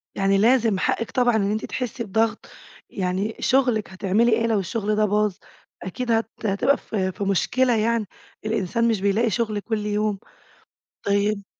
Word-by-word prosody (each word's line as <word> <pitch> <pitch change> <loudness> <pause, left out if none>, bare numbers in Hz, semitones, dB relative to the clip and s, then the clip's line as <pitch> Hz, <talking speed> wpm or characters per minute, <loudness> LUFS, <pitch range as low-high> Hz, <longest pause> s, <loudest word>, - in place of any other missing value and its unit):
يعني 195 0 +2
لازم، 225 -2 +3
حقِك 230 - -1
طبعًا 245 -2 +2
إن 200 -1 +1
أنتِ 215 +1 -2
تحسّي 250 -1 -4
بضغط، 220 +1 0 0.4
يعني 190 +3 -2
شغلِك، 250 -5 +2
هتعملي 200 +5 +1
إيه 230 +1 +2
لو 220 -3 +2
الشغل 210 +2 -2
ده 215 0 +3
باظ؟ 210 0 +1 0.5
أكيد 235 +7 -3
هت 225 0 +1 0.2
هتبقى 230 +8 +2
في 190 -3 -2
في 200 - -5
مشكلة 245 +6 +2
يعني. 225 0 +1 0.4
الإنسان 220 +2 0
مش 220 -4 0
بيلاقي 210 +4 +2
شغل 215 -1 -1
كل 210 0 -3
يوم. 210 -1 -1 0.8
طيب 200 0 0
215 Hz, 155 wpm, -23 LUFS, 200-230 Hz, 0.8 s, لازم